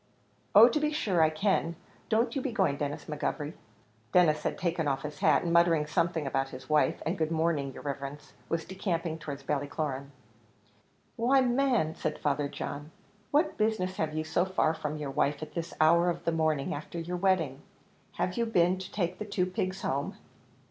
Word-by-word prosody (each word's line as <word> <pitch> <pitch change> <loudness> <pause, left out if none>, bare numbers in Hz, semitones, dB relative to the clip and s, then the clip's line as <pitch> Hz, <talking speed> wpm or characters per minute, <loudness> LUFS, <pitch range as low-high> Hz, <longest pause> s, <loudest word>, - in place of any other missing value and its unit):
"Oh 220 +3 +11
to 250 +5 +1
be 300 0 +1
sure 200 - +1
I 160 - +5
can; 170 +1 0 0.3
don't 230 +3 +2
you 270 - 0
be 265 - -2
going, 190 -11 +1
Denis 145 0 -3
McGovery." 150 0 -3 0.6
Denis 155 -4 +4
had - - -2
taken 170 -3 -1
off 135 -1 -1
his 150 -1 -6
hat, - - +4
and 170 -1 0
muttering 170 -3 +4
something 165 0 0
about 135 0 -1
his 130 0 -10
wife, 150 +1 +2
and 170 +3 -1
"good 160 -1 +1
morning, 160 -4 0
yer - - -10
riverence," 140 0 -6 0.2
was 165 0 -1
decamping 170 -4 -2
towards 145 -3 -6
Ballycloran. 140 -1 -2 1.1
"Why, 260 +4 +4
man," 245 - +2
said 155 - -3
Father 145 0 0
John, 145 +1 -6 0.4
"what 305 +2 +1
business 200 -4 0
have 155 -1 -1
you 155 - -1
so 155 +2 +1
far 185 -4 +1
from 155 -1 -4
your 145 -2 -4
wife 140 +2 0
at 155 - -9
this 170 0 -4
hour 170 +3 +5
of 170 0 -4
the 165 - +2
morning, 155 -3 0
after 155 +3 -6
your 175 +2 -3
wedding? 175 -8 +1 0.5
Have 180 - -2
you 235 -1 +1
been 180 -3 +3
to 190 0 -8
take 180 -2 -2
the 210 - -3
two 195 -3 0
pigs 185 +1 -3
home?" 140 +2 -2
165 Hz, 190 wpm, -29 LUFS, 150-185 Hz, 1.1 s, Oh